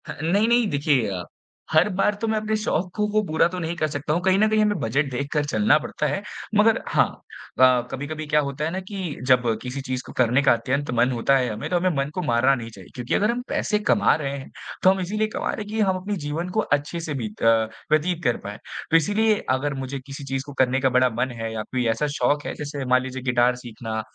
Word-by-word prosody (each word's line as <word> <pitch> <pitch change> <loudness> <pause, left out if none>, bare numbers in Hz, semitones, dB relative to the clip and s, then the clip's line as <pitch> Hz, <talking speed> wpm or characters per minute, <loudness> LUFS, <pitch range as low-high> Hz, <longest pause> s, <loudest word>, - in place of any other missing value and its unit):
ह - - -3
नहीं-नहीं। 220 +7 +3
देखिए, 140 -6 +1 0.6
हर 155 +4 +5
बार 210 +1 +2
तो 225 - 0
मैं 220 0 +1
अपने 215 0 -1
शौक 185 -4 -1
को 210 0 +1
पूरा 160 -1 +3
तो 180 +1 -5
नहीं 170 0 -3
कर 155 - +1
सकता 150 0 -2
हूँ, 170 - 0
कहीं 190 +1 +3
न 215 - +5
कहीं 215 0 +3
हमें 210 -3 +1
बजट 135 +6 0
देखकर 140 +3 -1
चलना 110 +1 +3
पड़ता 150 - -4
है। 195 - -2 0.3
मगर 215 +1 +4
हाँ, - - +3 0.5
अ, 130 -1 +6
कभी-कभी 155 +3 -5
क्या 150 0 +3
होता 140 +2 -3
है 160 - -2
ना 185 - -3
कि 190 -7 -4
जब 125 -1 +5 0.2
किसी 125 +3 -5
चीज़ 130 -1 -3
को - - -10
करने 125 +2 +3
का 140 - +6
अत्यंत 130 +4 -2
मन 125 +2 +4
होता 130 +3 +2
है 125 -2 0
हमें, 105 +1 -5
तो 180 - +2
हमें 185 +1 +2
मन 140 +1 0
को 180 - -1
मारना 130 -2 +3
नहीं 115 -3 -6
चाहिए। 95 -4 -13
क्योंकि 125 -1 -3
अगर 210 +2 +2
हम 245 +1 -3
पैसे 210 - 0
कमा 210 0 +3
रहे 140 -3 -3
हैं, 135 - -9 0.3
तो 185 - +7
हम 190 0 +2
इसीलिए 210 +4 -1
कमा - - -2
रहे - - -4
हैं - - -13
कि 220 +1 -3
हम 190 -3 +2
अपने 205 +2 -3
जीवन 160 +5 -3
को - - +5 0.2
अच्छे 145 +4 -6
से 160 -2 -4
बीत 110 -1 -6
अ, 115 -1 +4 0.2
व्यतीत 170 +3 +1
कर 120 - +2
पाएँ। 105 0 -6 0.3
तो 165 - +7
इसीलिए 210 +5 +2
अगर 135 +3 0
मुझे 135 +1 -5
किसी 135 +2 -9
चीज़ 135 -1 -2
को 145 - -9
करने 130 +1 0
का 135 -1 +2
बड़ा 130 0 +4
मन 130 - 0
है 115 0 -3
या 110 -1 -3
कोई 125 +2 -2
ऐसा 150 +6 -1
शौक 145 0 +1
है, - - -3
जैसे 145 -2 -5
मान 130 0 +3
लीजिए 130 0 -6
गिटार 120 0 +3
सीखना 115 -2 -5
145 Hz, 245 wpm, -24 LUFS, 125-185 Hz, 0.6 s, तो